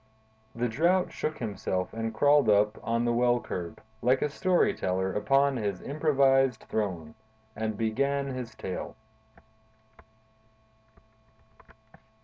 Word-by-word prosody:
The 120 +1 0
Drought 175 +10 +1
shook 155 - -3
himself 95 -4 -3
and 115 0 -3
crawled 145 +4 +4
up 105 +1 +3
on 115 +1 -1
the 120 - +1
well 120 0 +3
curb, 85 -7 -6 0.2
like 130 +2 +2
a 150 - -1
story 185 +5 +2
teller 95 - -1
upon 135 +5 +2
his 100 -5 -2
improvised 135 -4 +2
throne, 90 -8 -3 0.4
and 110 -1 -3
began 140 +6 0
his 130 -3 -6
tale. 90 - -6
120 Hz, 115 wpm, -28 LUFS, 105-140 Hz, 0.4 s, crawled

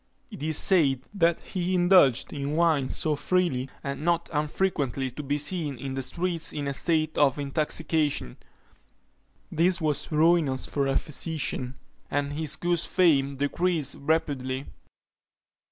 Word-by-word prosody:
It - - -9
is 155 0 +1
said 140 -9 +4
that 170 -4 +2
he 185 -1 -2
indulged 175 -8 +4
in 145 0 -3
wine 155 -6 +2
so 155 +2 0
freely, 145 -4 0
as 140 -1 -4
not 170 +2 0
unfrequently 145 -4 -1
to 135 - -7
be 145 0 -1
seen 150 -2 -2
in 135 +2 -5
the 135 - -3
streets 170 +5 -1
in 145 -1 -4
a 140 - -1
state 155 +1 0
of 140 -2 +3
intoxication. 150 - -1 1.1
This 175 +3 +2
was 155 -2 -2
ruinous 155 -4 +2
for 140 -2 -1
a 135 - +1
physician, 150 -4 -3 0.3
and 145 0 -1
his 155 -1 0
good 175 +2 0
fame 145 -7 +2
decreased 145 +1 -1
rapidly. 140 -3 -1
150 Hz, 135 wpm, -26 LUFS, 140-170 Hz, 1.1 s, said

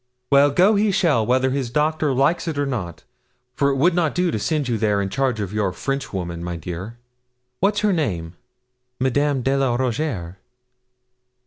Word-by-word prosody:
Well, 140 +1 +6
go 180 +9 +4
he 210 +1 +2
shall, 170 - +2
whether 130 +1 +2
his 135 -3 -2
doctor 150 +2 +1
likes 140 +7 +1
it 160 -3 -3
or 145 - +1
not, 105 -11 -4 0.5
for 140 +2 +1
it 140 - 0
would 165 +7 +3
not 165 -3 0
do 180 -1 +1
to 110 - -2
send 150 +4 -1
you 115 -3 -1
there 105 -2 +1
in 100 -1 -1
charge 130 -1 -1
of 100 -1 -4
your 105 -3 0
Frenchwoman, 90 -8 -4
my 85 0 -4
dear. 90 +7 -7 0.6
What's 205 +2 +1
her 210 -2 +2
name?' 90 - -2 0.7
'Madame 135 +1 +1
de 135 +2 +1
la 135 -3 +1
Rougierre.' 120 - -2
135 Hz, 180 wpm, -22 LUFS, 105-150 Hz, 0.7 s, Well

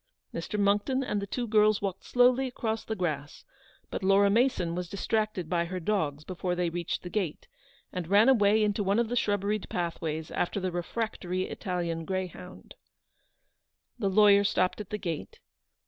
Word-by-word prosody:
Mr. 210 - -3
Monckton 205 +7 +2
and 210 -5 -1
the 200 - -4
two 240 +4 -2
girls 215 -1 +4
walked 195 -2 -3
slo^yly 250 +2 +4
across 225 -3 -3
the 220 - -3
grass; 155 -6 -4 0.5
but - - -3
Laura 195 +1 +4
Mason 220 -7 +2
was 180 0 -4
distracted 215 -3 -1
by 170 0 0
her 185 +2 -4
dogs 160 -6 -1
before 180 +1 -3
she 175 -1 0
reached 175 +1 -3
the 180 - -6
gate, 185 -8 -2 0.5
and 180 -3 -4
ran 205 +5 +5
away 215 -4 +5
into 210 0 +1
one 200 +2 +1
of 235 -1 +1
the 245 - -1
shrubberied 205 -2 0
pathways 160 -2 -3
after 180 - -1
the 185 -1 -2
refractory 185 0 -3
Italian 175 -5 -3
greyhound. 185 0 -6 1.3
The 200 -4 +1
lawyer 200 0 +6
stopped 185 0 +1
at 205 - -9
the 210 - -2
gate. 170 -6 -5
195 Hz, 165 wpm, -29 LUFS, 175-215 Hz, 1.3 s, lawyer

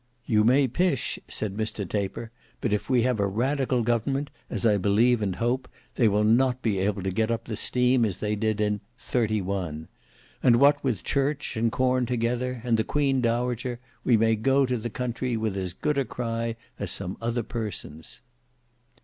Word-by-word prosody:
"You 105 -2 +3
may 130 +4 +4
pish," 140 +1 0
said 100 -3 -4
Mr 110 -2 -3
Taper, 105 +4 -3 0.3
"but 115 - -1
if 105 - -2
we 125 -3 +3
have 125 -3 +1
a 100 - +2
radical 130 +4 0
government, 130 +5 0 0.2
as - - 0
I 105 -2 +4
believe 110 +5 +3
and 95 -3 -1
hope, 120 +4 -1 0.2
they 120 - +3
will 105 0 +2
not 125 +3 +3
be 105 -4 +1
able 100 0 0
to 95 - -1
get 110 +4 0
up 115 -1 -2
the 110 - -4
steam 125 +2 +3
as 100 -6 0
they 105 0 -1
did 110 0 0
in 105 -1 0 0.2
—31; 100 -10 -2 0.5
and 120 -2 +5
what 140 +3 +4
with 120 -9 -1
church 140 +1 -1
and 115 +1 +1
corn 130 0 +1
together, 125 +1 -1
and 115 -2 +2
the 110 - +2
Queen 135 0 +1
Dowager, 120 +1 -1 0.2
we 120 - +4
may 115 +1 +3
go 135 +5 +3
to 125 -1 -1
the 120 +1 -4
country 125 +1 -2
with 110 -3 -1
as 95 -2 -3
good 150 - -1
a - - +2
cry 115 -2 -3 0.2
as - - -2
some 90 - -3
other 120 +1 -1
persons." 105 - -6
115 Hz, 185 wpm, -26 LUFS, 105-125 Hz, 0.5 s, and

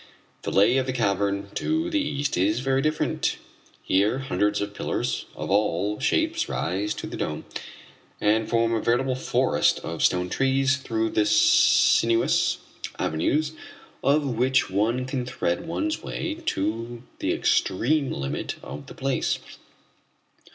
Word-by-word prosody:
The - - -4
lay 100 +6 +4
of 130 0 0
the 130 - -1
cavern 100 -3 0
to 320 +1 0
the 310 - +2
east 145 - -1
is 105 +6 +1
very 135 0 +1
different. 155 +2 0 0.5
Here 100 +6 +2
hundreds 105 -5 0
of 100 0 -3
pillars - - -2
of - - -5
all 100 0 +1
shapes 320 - +1
rise 100 +5 -2
to - - -6
the - - -6
dome, - - -3 0.7
and 110 +1 +2
form 115 0 +2
a 110 - 0
veritable 130 +3 +1
forest 130 - +1
of 80 -1 -5
stone 90 0 +2
trees 135 +4 +2
through 115 -4 -2
the 105 -1 +2
sinuous 105 +2 +4 0.4
avenues 145 - 0 0.5
of 145 +2 +3
which 130 -2 +1
one 115 +6 +1
can 130 -1 -2
thread 120 - -2
one's 315 - -2
way 320 0 -4
to 115 +4 -2 0.2
the - - 0
extreme 135 +9 +1
limit 70 -1 -3
of 70 0 -8
the - - -11
place. 135 0 0
115 Hz, 140 wpm, -25 LUFS, 100-135 Hz, 0.7 s, lay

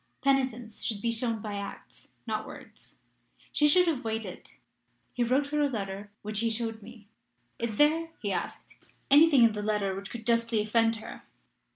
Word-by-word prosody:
Penitence 255 -5 0
should 215 -3 -2
be 235 +2 0
shown 230 -2 -2
by 205 -2 -4
acts, 200 0 -9 0.2
not - - -3
words: - - -13 0.6
she 295 - +3
should 360 +4 +5
have 300 -6 0
waited.' 220 -4 -5 0.6
He 245 - 0
wrote 265 +4 +1
her 300 0 0
a 290 - +3
letter, 200 -3 -5
which 210 0 -3
he 230 +1 +1
showed 225 0 -3
me. 220 -1 -13 0.5
'Is 230 -2 -2
there,' 320 +5 +3
he 205 - -2
asked, 175 - -5 0.3
'anything 290 -3 +7
in 230 - +6
the 210 -1 -4
letter 205 -2 0
which 195 +1 -6
could 230 -2 -8
justly 230 -1 +2
offend 225 +2 +2
her?' 220 - -9
230 Hz, 175 wpm, -29 LUFS, 210-255 Hz, 0.6 s, anything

